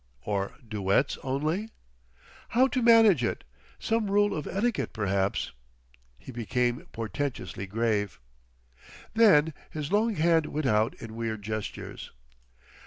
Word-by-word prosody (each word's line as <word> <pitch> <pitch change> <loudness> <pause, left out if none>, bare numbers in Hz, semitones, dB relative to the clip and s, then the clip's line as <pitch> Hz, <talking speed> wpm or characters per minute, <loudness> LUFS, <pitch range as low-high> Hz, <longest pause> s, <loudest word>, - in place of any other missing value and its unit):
"Or 100 -1 -2
duets 105 +5 +1
only?... 155 +11 -1 0.8
"How 255 +3 +4
to 255 - 0
manage 225 - +6
it? 115 - -2 0.3
Some 225 -2 0
rule 205 0 +3
of 150 - -4
etiquette, 220 +4 -1
perhaps."... 100 -2 0 0.7
He 65 - -11
became 120 +1 -1
portentously 115 -3 -4
grave. 105 -1 -1 0.9
Then 165 -9 +5 0.2
his 150 0 -5
long 215 +2 +2
hand 165 -1 +3
went 150 0 -3
out 110 -2 +2
in 110 -1 -9
weird 110 -2 -3
gestures. 110 0 -5
135 Hz, 115 wpm, -28 LUFS, -, 0.9 s, manage